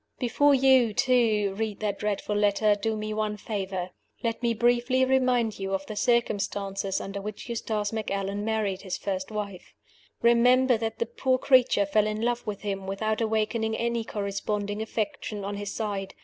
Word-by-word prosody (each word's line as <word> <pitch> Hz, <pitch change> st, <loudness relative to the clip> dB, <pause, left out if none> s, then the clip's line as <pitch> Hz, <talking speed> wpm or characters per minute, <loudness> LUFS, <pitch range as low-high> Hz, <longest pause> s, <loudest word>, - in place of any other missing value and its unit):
Before 280 Hz, +3 st, +3 dB
you, 260 Hz, -5 st, +4 dB
too, 230 Hz, -6 st, +2 dB
read 220 Hz, -2 st, -2 dB
that 205 Hz, -2 st, -2 dB
dreadful 210 Hz, 0 st, -2 dB
letter, 205 Hz, +1 st, +3 dB
do 215 Hz, +2 st, -2 dB
me 215 Hz, 0 st, -3 dB
one 215 Hz, -1 st, -1 dB
favor. 190 Hz, -3 st, -4 dB, 0.3 s
Let 230 Hz, 0 st, -1 dB
me 235 Hz, -1 st, +1 dB
briefly 245 Hz, +3 st, +3 dB
remind 255 Hz, -5 st, +2 dB
you 195 Hz, 0 st, -1 dB
of 195 Hz, 0 st, -4 dB
the 215 Hz, -, -7 dB
circumstances 200 Hz, -4 st, 0 dB
under 195 Hz, 0 st, -5 dB
which 210 Hz, +3 st, -7 dB
Eustace 220 Hz, -3 st, -2 dB
Macallan 200 Hz, -2 st, -2 dB
married 210 Hz, -3 st, -1 dB
his 190 Hz, -3 st, -4 dB
first 190 Hz, -2 st, -3 dB
wife. 200 Hz, -, -6 dB, 0.5 s
Remember 250 Hz, +2 st, +5 dB
that 225 Hz, 0 st, -3 dB
the 470 Hz, -, 0 dB
poor 265 Hz, -, 0 dB
creature 255 Hz, -6 st, +4 dB
fell 210 Hz, +2 st, +2 dB
in 215 Hz, 0 st, -2 dB
love 240 Hz, +1 st, -1 dB
with 205 Hz, -2 st, -4 dB
him 195 Hz, -2 st, -4 dB
without 215 Hz, +3 st, -1 dB
awakening 220 Hz, 0 st, 0 dB
any 235 Hz, 0 st, -1 dB
corresponding 205 Hz, 0 st, -3 dB
affection 215 Hz, -2 st, -3 dB
on 200 Hz, 0 st, -4 dB
his 205 Hz, 0 st, -4 dB
side. 200 Hz, -3 st, -4 dB
215 Hz, 165 wpm, -27 LUFS, 200-235 Hz, 0.5 s, Remember